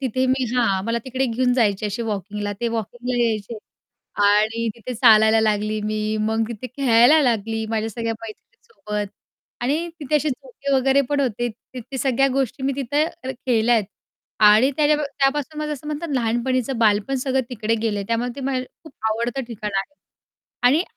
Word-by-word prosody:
तिथे 260 0 0
मी 260 0 +1
हां, 200 -6 +1
मला 230 +1 0
तिकडे 260 +1 -1
घेऊन 250 +1 +1
जायचे 210 -4 +1
असे 210 +3 -3
वॉकिंगला 205 -1 -3
ते 235 - 0
वॉकिंगला 240 +2 -2
यायचे 220 -1 -1 0.7
आणि 215 +3 +3
तिथे 240 +2 -7
चालायला 220 0 +6
लागली 215 0 0
मी, 215 0 -1
मग 220 +1 0
तिथे 235 +2 -6
खेळायला 260 +3 +5
लागली 225 -2 0
माझ्या 225 0 -1
सगळ्या 230 +1 -3
मैत्रिणीसोबत 215 - -7 0.5
आणि 295 +8 0
तिथे 300 +1 +1
असे 300 +1 0
झोके 280 - -5
वगैरे 270 +1 +3
पण 290 -1 +1
होते 240 -2 -1 0.3
ते 255 - -5
ते 265 +3 -7
सगळ्या 265 +1 +2
गोष्टी 270 -1 -1
मी 275 +1 +1
तिथं 280 +3 +1 0.2
अ, 260 - -2 0.2
केल्या 240 -1 +3
आहेत 220 -3 +2 0.6
आणि 220 +6 +5
त्याजा 300 0 +4
त्यापासून 280 +2 -1
माझं 300 0 -2
असं 295 0 -8
म्हणतात 305 +2 -4
लहानपणीचं 245 +1 0
बालपण 215 +2 +2
सगळं 265 +1 0
तिकडे 225 -2 -1
गेले, 210 -3 -1
त्यामुळे 230 +2 0
ते - - -6
मला 265 -1 -1 0.3
खूप 315 - -13 0.2
आवडतं 235 +4 -2
ठिकाण 210 -3 -5
आहे 195 +9 -3 0.7
आणि 300 +7 +3
240 Hz, 170 wpm, -22 LUFS, 220-270 Hz, 0.7 s, चालायला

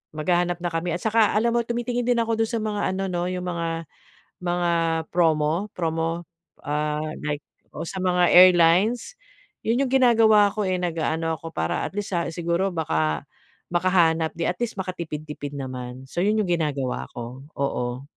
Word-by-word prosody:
maghahanap 175 +2 0
na 175 - 0
kami. 165 +1 -1
At 175 - -6
saka 220 -1 +3
alam 235 +2 +2
mo - - +4
tumitingin 240 +1 -2
din 245 -1 +3
ako 225 -1 -1
do'n 225 -1 +1
sa 230 - 0
mga 210 -1 -2
ano 195 +1 -2
'no 175 0 -1
'yong 180 0 -3
mga 170 -2 -2 0.7
mga 175 0 0 0.4
promo 160 +1 +2
promo, 165 0 -1 0.4
ah, 150 +1 -1 0.2
like 145 0 -2 0.3
oo, - - -5
sa 190 - -5
mga 180 -1 +3
airlines? 185 - +5 0.5
'Yun 235 +4 +2
'yong - - -5
ginagawa 225 -5 +6
ko, 215 - -1
eh, 185 -1 0
nag-aano 165 -1 -1
ako 165 - -8
para 80 - -1
at - - -6
least 205 -2 -3
sa 170 -1 0
siguro 170 +3 0
baka 80 - 0 0.5
makahanap 170 -3 +3
di 170 - -2
at 180 - -2
least 240 -3 -2
makatipid-tipid 155 -5 -5
naman. 130 -1 -6
So, 175 - -3
'yun 210 +2 +2
'yong 195 -4 -1
ginagawa 140 -4 -2
ko. 120 +2 -7 0.2
Oo. 125 -2 -2
175 Hz, 170 wpm, -24 LUFS, 155-205 Hz, 0.7 s, ginagawa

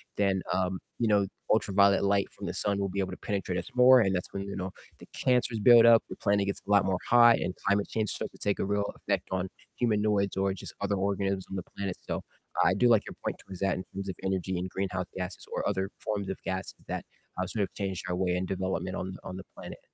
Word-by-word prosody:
then, 95 -2 +1
um, 95 0 0 0.2
you 115 - +2
know, 100 -2 +3 0.2
ultraviolet 100 -2 +4
light 100 0 +2
from - - -7
the - - -3
sun 100 -1 0
will 100 -1 -1
be 100 +2 -3
able 95 -1 -1
to 95 - -6
penetrate 95 -3 -2
us - - -7
more, 125 +1 +8
and 95 -2 +2
that's 90 - -3
when, 100 - -3
you 100 - -6
know, 95 0 -4 0.3
the - - -12
cancers 125 -3 +1
build 115 +1 +8
up, 115 -1 +8
the - - -6
planet 100 -1 +1
gets 100 - -2
a - - -3
lot 100 -2 +5
more 95 -1 +1
hot, 120 -1 +7
and 90 - -3
climate 100 0 +2
change 110 -2 -1
starts - - -4
to - - -17
take 100 - 0
a - - 0
real 100 0 0
effect 100 -3 -2
on 95 0 -1 0.3
humanoids 105 -4 +1
or 95 0 +2
just 95 - -8
other 100 - 0
organisms 100 0 -1
on 95 - -5
the 90 - -3
planet, 100 -2 -3
so - - -4 0.4
I 90 - +4
do 120 +5 +4
like 110 -4 +4
your - - -8
point - - -1
towards 95 -2 -10
that 95 -2 +2
in 90 - -4
terms 100 0 -4
of 90 - -4
energy 95 -1 -1
and 95 +1 -3
greenhouse 95 -1 -2
gases 90 0 -5
or - - -1
other 95 +1 -1
forms 100 -3 -3
of 95 - -3
gases 95 0 -3
that, - - -4 0.3
uh, 95 - 0
sort 105 +2 -1
of 95 - -5
change 95 -3 -3
our 90 - -1
way 90 -1 0
and 90 +1 -1
development 95 0 -2
on 95 0 -4
on 90 - -6
the 95 - -7
planet. - - -9
100 Hz, 250 wpm, -29 LUFS, 95-100 Hz, 0.4 s, more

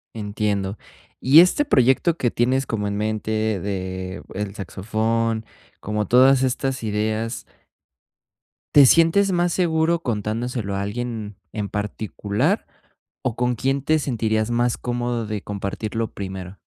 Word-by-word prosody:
Entiendo. 105 -1 -2 0.4
Y 140 +5 +7
este 180 - +5
proyecto 135 - +3
que 120 -6 0
tienes 130 +3 +1
como 105 -4 -2
en 100 0 -2
mente 110 0 -1
de 95 -1 -4
el 100 0 -4
saxofón, 110 +4 -1 0.3
como 105 +1 -2
todas 130 +3 +5
estas 130 0 -1
ideas 110 +2 -2 1.3
¿Te 145 -2 +9
sientes 165 +7 +4
más 175 0 +2
seguro 165 -1 +1
contándoselo 115 - -2
a - - -1
alguien 110 0 -4 0.2
en 105 -2 -3
particular 105 0 -2 0.6
o 125 -4 -2
con 125 0 0
quién 135 +4 0
te 155 +2 +2
sentirías 110 -5 0
más 120 0 +1
cómodo 120 -2 -2
de 105 -1 -3
compartirlo 105 +3 -4
primero? 95 -1 -7
110 Hz, 125 wpm, -22 LUFS, 105-130 Hz, 1.3 s, Te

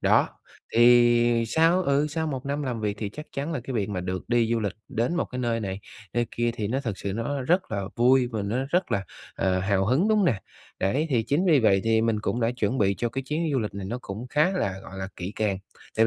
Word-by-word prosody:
Đó, - - +4 0.5
thì 120 0 +5
sau 165 +8 +3
ừ, 140 -1 +2
sau 160 +1 -2
một 135 -3 -4
năm 145 +1 -2
làm 125 -4 -3
việc, 105 -1 -1
thì 105 - -3
chắc 150 +9 -9
chắn 145 +4 -3
là 135 - -2
cái 130 - -5
việc 105 -4 0
mà 95 -3 -3
được 90 +2 -4
đi 120 -2 +2
du 115 - +1
lịch 100 -2 -1 0.2
đến 120 +9 -1
một 175 - +1
cái 125 - -7
nơi 115 -2 0
này, 95 -1 -4 0.3
nơi 120 -1 +1
kia 120 0 0
thì 105 -3 -3
nó 130 +5 0
thực 110 -8 -4
sự 100 - -3
nó 130 +5 -2
rất 175 +7 +1
là 100 - -1
vui 125 +1 +4
và 110 -4 -3
nó 105 +5 -2
rất 180 +1 +1
là, 100 - 0 0.3
ờ, 95 -1 +1
hào 95 0 +1
hứng, 145 - +2
đúng 215 - +4
hông 195 - +3
nè? 105 -7 +1 0.4
Đấy, 135 - +1
thì 120 -4 +2
chính 145 +11 0
vì 155 -7 +5
vậy 100 -3 +4
thì 110 0 +3
mình 115 -2 +1
cũng 120 +3 -1
đã 115 - +2
chuẩn 120 +1 -1
bị 100 -1 +3
cho 120 - 0
cái 135 +3 -4
chuyến 155 +5 -2
du 135 - +2
lịch 105 -3 -3
này 100 -1 -5
nó 120 +5 -3
cũng 105 +6 -6
khá 150 +5 +3
là, 100 - -1
gọi 95 - -9
là, 95 0 -4
kỹ 90 +3 -5
càng. 105 -3 0 0.4
Tại 115 +1 +5
120 Hz, 265 wpm, -26 LUFS, 105-140 Hz, 0.5 s, thì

